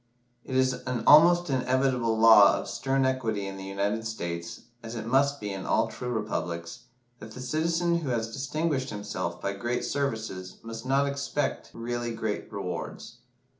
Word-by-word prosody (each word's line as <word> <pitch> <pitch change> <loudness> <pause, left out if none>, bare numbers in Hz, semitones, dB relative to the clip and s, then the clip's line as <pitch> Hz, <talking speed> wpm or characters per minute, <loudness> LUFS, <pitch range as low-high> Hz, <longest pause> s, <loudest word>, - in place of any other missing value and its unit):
It 130 - -5
is 130 0 +3
an 125 -3 -2
almost 175 +1 +7
invariable 130 -3 +1
law 110 -3 +8
of - - -5
stern 135 0 0
equity 115 -6 -1
in 95 0 -6
the 95 - -7
United 100 +3 -2
States, 85 -6 -5 0.2
as 115 +1 -7
it 110 - -5
must 140 +4 +2
be 105 -2 -4
in 95 -1 -6
all - - +2
true 125 - -6
republics, 105 -2 -4 0.3
that 110 0 -10
the 130 - -9
citizen 165 +6 0
who 150 -5 -4
has 115 -2 -2
distinguished 140 0 -1
himself 90 -4 -4
by 100 - -2
great 120 +5 -2
services 110 -9 -3
must 115 +2 -7
not 135 +1 +3
expect 140 0 -2
really 120 0 -3
great 110 -1 -3
rewards. 90 -5 -6
120 Hz, 165 wpm, -28 LUFS, 105-135 Hz, 0.3 s, law